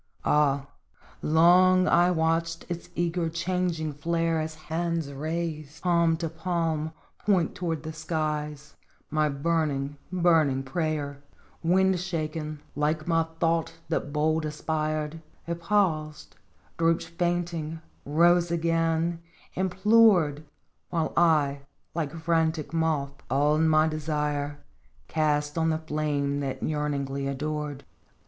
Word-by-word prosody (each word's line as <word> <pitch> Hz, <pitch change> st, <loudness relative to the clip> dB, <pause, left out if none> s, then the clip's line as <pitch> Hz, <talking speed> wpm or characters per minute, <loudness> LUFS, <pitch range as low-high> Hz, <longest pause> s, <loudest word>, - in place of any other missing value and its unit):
Ah! 140 Hz, -2 st, +3 dB, 0.6 s
long 180 Hz, +3 st, +5 dB
I 175 Hz, +1 st, +5 dB
watched 165 Hz, 0 st, 0 dB
its 170 Hz, -1 st, -5 dB
eager, 170 Hz, 0 st, 0 dB
changing 170 Hz, -2 st, -1 dB
flare 165 Hz, +2 st, 0 dB
As 155 Hz, 0 st, -4 dB
hands 160 Hz, -1 st, -3 dB
raised, 155 Hz, +1 st, -4 dB
palm 170 Hz, -2 st, +3 dB
to 165 Hz, 0 st, -2 dB
palm, 160 Hz, -1 st, -2 dB, 0.3 s
point 185 Hz, -6 st, +2 dB
toward 165 Hz, -4 st, -3 dB
the 160 Hz, 0 st, -5 dB
skies 150 Hz, -2 st, -3 dB, 0.4 s
My 155 Hz, -1 st, +2 dB
burning, 145 Hz, -1 st, -1 dB
burning 165 Hz, -7 st, +3 dB
prayer! 145 Hz, -1 st, -2 dB, 0.2 s
" -, -, -30 dB
Wind 190 Hz, +2 st, +3 dB
shaken, 155 Hz, -4 st, -4 dB
like 155 Hz, +2 st, 0 dB
my 165 Hz, -1 st, +2 dB
thought 165 Hz, -1 st, +1 dB
that 160 Hz, -3 st, -1 dB
bold 155 Hz, +2 st, +1 dB
aspired, 155 Hz, 0 st, -2 dB, 0.2 s
It 170 Hz, 0 st, -4 dB
paused, 160 Hz, -7 st, 0 dB, 0.4 s
drooped 165 Hz, +1 st, +2 dB
fainting, 170 Hz, -2 st, -2 dB, 0.2 s
rose 170 Hz, +4 st, +4 dB
again, 165 Hz, 0 st, 0 dB, 0.3 s
implored, 190 Hz, -5 st, +4 dB, 0.5 s
While 165 Hz, -2 st, -1 dB
I, 150 Hz, -5 st, +3 dB, 0.3 s
like 160 Hz, -4 st, -2 dB
frantic 160 Hz, -1 st, 0 dB
moth, 155 Hz, -4 st, 0 dB, 0.2 s
all 145 Hz, +4 st, +3 dB
my 160 Hz, -1 st, +4 dB
desire 150 Hz, -2 st, -2 dB, 0.5 s
Cast 150 Hz, 0 st, 0 dB
on 160 Hz, 0 st, +2 dB
the 160 Hz, -, +1 dB
flame 150 Hz, -2 st, -1 dB
that 135 Hz, -2 st, -3 dB
yearningly 140 Hz, -2 st, -1 dB
adored. 145 Hz, 0 st, -3 dB
160 Hz, 110 wpm, -27 LUFS, 150-170 Hz, 0.6 s, long